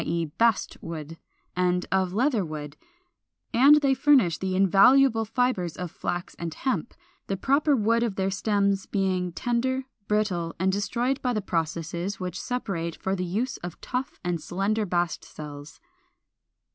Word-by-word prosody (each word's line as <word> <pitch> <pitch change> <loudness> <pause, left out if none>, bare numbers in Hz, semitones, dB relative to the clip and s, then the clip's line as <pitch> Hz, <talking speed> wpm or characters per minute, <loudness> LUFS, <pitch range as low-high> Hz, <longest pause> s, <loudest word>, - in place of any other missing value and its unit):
e. 170 +1 -1
Bast 230 -3 +2
wood) 165 -1 -7 0.4
and 180 0 +1
of 190 -1 +2
Leatherwood; 180 - -1 0.8
and 285 +5 +7
they 275 -1 +3
furnish 260 - +4
the 190 -1 -2
invaluable 225 +6 +5
fibres 220 -7 0
of 180 -2 -5
flax 175 0 -4
and 170 -1 -3
hemp; 260 -2 -2 0.3
the 195 - -2
proper 280 +6 +3
wood 230 0 +2
of 230 -5 -1
their 190 0 0
stems 200 0 0
being 185 -3 0
tender, 245 +8 -1 0.2
brittle, 190 -6 0
and 190 +2 +1
destroyed 240 +7 -1
by 250 -1 0
the 215 - 0
processes 170 +1 -3
which 180 -1 -4
separate 190 -10 -3
for 190 - -1
use 195 +8 -2
the 175 -1 -6
tough 255 +1 -4
and 175 -2 -1
slender 200 +6 -1
bast 175 -2 -1
cells. 145 -1 -10
195 Hz, 145 wpm, -26 LUFS, 175-235 Hz, 0.8 s, and